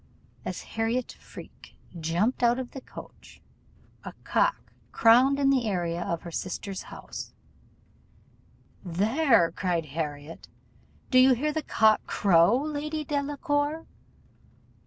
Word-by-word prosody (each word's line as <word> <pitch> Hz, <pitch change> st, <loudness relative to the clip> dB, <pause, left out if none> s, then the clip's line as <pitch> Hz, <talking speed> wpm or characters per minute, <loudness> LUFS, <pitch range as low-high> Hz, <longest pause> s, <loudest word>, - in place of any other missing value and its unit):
As -, -, -5 dB
Harriot 225 Hz, +2 st, -2 dB
Freke -, -, -14 dB, 0.2 s
jumped 170 Hz, +10 st, 0 dB
out 240 Hz, 0 st, +3 dB
of 255 Hz, -2 st, -5 dB
the 270 Hz, -, -8 dB
coach, -, -, -13 dB, 0.6 s
a -, -, -8 dB
cock -, -, 0 dB, 0.2 s
crowed 250 Hz, +5 st, +5 dB
in 275 Hz, -1 st, +3 dB
the 255 Hz, -4 st, +1 dB
area 175 Hz, -3 st, -2 dB
of 170 Hz, -1 st, -3 dB
her 170 Hz, -, -8 dB
sister's 185 Hz, +3 st, -5 dB
house: -, -, -9 dB, 1.5 s
'There!' 210 Hz, -, +2 dB
cried 170 Hz, -5 st, -2 dB
Harriot, 150 Hz, 0 st, -5 dB, 0.6 s
'do 255 Hz, -, +6 dB
you 260 Hz, +1 st, +7 dB
hear 300 Hz, +5 st, -1 dB
the 315 Hz, -, -1 dB
cock 220 Hz, -6 st, +3 dB
crow, 190 Hz, +3 st, +4 dB
Lady 305 Hz, +1 st, -3 dB
Delacour? 290 Hz, +2 st, -2 dB
235 Hz, 115 wpm, -27 LUFS, 175-280 Hz, 1.5 s, you